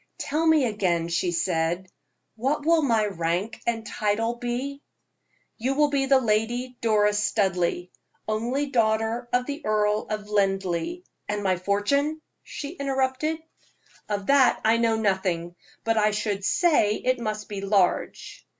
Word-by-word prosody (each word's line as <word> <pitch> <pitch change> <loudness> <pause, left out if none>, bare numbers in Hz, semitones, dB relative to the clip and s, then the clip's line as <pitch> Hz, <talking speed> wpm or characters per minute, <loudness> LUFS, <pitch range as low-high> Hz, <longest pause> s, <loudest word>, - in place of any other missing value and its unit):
"Tell 315 +3 -1
me 315 -4 +5
again;" 180 -7 0
she 175 +1 0
said, 170 +1 -1 0.5
"what 275 +6 -1
will 330 0 +4
my 230 -7 +2
rank 185 +3 -2
and 225 -1 -1
title 220 +1 0
be?" 245 +4 -4 0.8
"You 260 +4 0
will 295 0 +3
be 275 -1 +1
the 270 0 +5
Lady 240 +2 -1
Doris 210 -2 +2
Studleigh, 180 -4 0 0.4
only 235 +6 -1
daughter 230 -1 0
of 250 0 +1
the 285 +2 -5
Earl 210 -1 +1
of 210 -1 -4
Linleigh 195 - -1
" - - -33
"And 210 0 -2
my 190 -1 +2
fortune?" 205 - 0 0.2
she 285 - -7
interrupted. 280 +1 -1 0.7
"Of 200 -1 -2
that 275 0 +4
I 225 +1 +4
know 230 -1 +2
nothing; 190 -5 -1 0.3
but 225 0 +1
I 210 0 +4
should 205 -1 -2
say 220 - +3
it 255 +2 0
must 215 -2 -4
be 200 -2 -5
large. 195 -2 0
220 Hz, 145 wpm, -25 LUFS, 200-260 Hz, 0.8 s, me